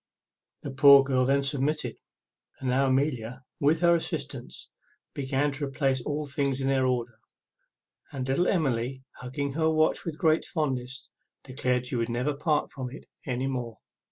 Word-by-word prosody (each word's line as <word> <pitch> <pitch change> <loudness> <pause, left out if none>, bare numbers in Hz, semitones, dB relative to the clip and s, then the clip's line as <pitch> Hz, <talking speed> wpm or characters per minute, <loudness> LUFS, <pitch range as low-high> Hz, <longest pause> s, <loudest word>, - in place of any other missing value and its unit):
The 140 - -5
poor 140 +1 +8
girl 130 -2 +1
then 140 +1 +2
submitted; 145 +2 +1 0.6
and 130 -2 -1
now 135 +2 +2
Amelia, 130 -2 -1 0.2
with 155 +3 +2
her 170 -1 +5
assistance, 165 - -3 0.4
began 140 +1 0
to 140 +1 -3
replace 135 -1 0
all 150 +3 -3
things 140 -1 -1
in 135 0 0
their 130 -1 +2
order; 120 -3 -2 0.9
and 130 -2 -4
little 135 +7 +1
Emily 130 - 0
hugging 140 +3 -4
her 160 +1 +1
watch 155 0 +2
with 165 -3 -5
great 160 0 +2
fondness, 135 -5 -2 0.3
declared 125 -2 -1
she 125 0 -2
would 115 0 -1
never 125 +5 -1
part 150 +1 0
with 130 0 -5
it - - -12 0.2
any 130 0 -1
more. 125 -4 -4
135 Hz, 155 wpm, -27 LUFS, 130-145 Hz, 0.9 s, poor